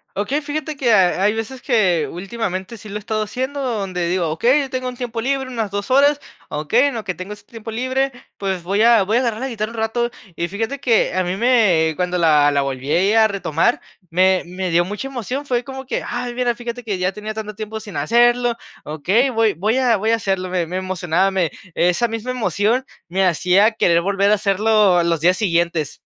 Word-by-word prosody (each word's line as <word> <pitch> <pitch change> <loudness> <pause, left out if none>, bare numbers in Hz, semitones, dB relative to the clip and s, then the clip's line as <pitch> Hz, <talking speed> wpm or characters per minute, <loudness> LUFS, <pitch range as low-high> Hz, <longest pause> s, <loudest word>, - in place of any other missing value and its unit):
Okey, 255 +10 -1
fíjate 305 +1 -4
que 260 -4 +1
hay 195 +2 +3
veces 225 +4 -5
que 190 - +2
últimamente 190 +2 -4
sí 210 +1 -11
lo 200 - -7
he - - -2
estado 215 +1 -2
haciendo 260 +6 -4
donde 195 -8 -2
digo: 180 -2 0
"Okey, 245 - +3
yo 270 - -4
tengo 255 0 -3
un 250 - -9
tiempo 235 -2 -4
libre, 265 +1 -1
unas 225 -5 -3
2 200 +3 -4
horas, 285 +2 +4 0.3
okey, 190 - +2
en 280 -4 -1
lo 225 - -4
que 180 - -3
tengo 185 +3 -8
este 210 - -11
tiempo 225 -1 -8
libre, 260 +3 -1 0.3
pues 190 -3 -3
voy 200 +4 0
a 230 -3 +6
voy 215 +5 +1
a - - +4
agarrar 230 -3 -1
la 265 - -3
guitarra 220 -2 -4
un 235 - -10
rato", 230 +2 0 0.3
y 170 - -2
fíjate 225 +8 -3
que 235 -4 +2
a 185 0 +1
mí 180 +1 -2
me, 200 -10 +3
cuando 180 0 -1
la 150 -3 +4
la 140 -1 +1
volví 135 +1 -4
ahí 195 +6 +3
a 220 -1 +5
retomar, 200 +1 0 0.3
me 185 +2 +3
me 180 0 -4
dio 170 +1 +4
mucha 210 +8 -5
emoción, 265 +2 -4
fue 245 -2 0
como 265 0 -8
que: - - -3
"Ay 245 0 -4
mira, 240 -1 0
fíjate 240 +1 -6
que 205 -4 -2
ya 185 +1 -1
tenía 210 +2 -6
tanto 215 -2 -6
tiempo 220 0 -6
sin 210 -2 -10
hacerlo". 240 0 +3 0.3
¿Okey? 190 - +1
Voy 225 -4 +2
voy 210 +9 0
a, 250 -3 +3
voy 215 +3 -1
a 230 - +4
hacerlo, 190 -4 -2
me 180 -2 0
me 180 +3 -4
emocionaba, 185 0 0
me 180 -4 0 0.2
esa 180 +7 +2
misma 225 +3 -4
emoción 225 +2 0 0.2
me 190 +2 +1
hacía 185 +5 +3
querer 170 -5 +3
volver 200 +2 +1
a - - +6
hacerlo 205 -2 +3
los 165 -2 0
días 180 +2 +3
siguientes. 170 -6 0
210 Hz, 220 wpm, -20 LUFS, 185-240 Hz, 0.3 s, a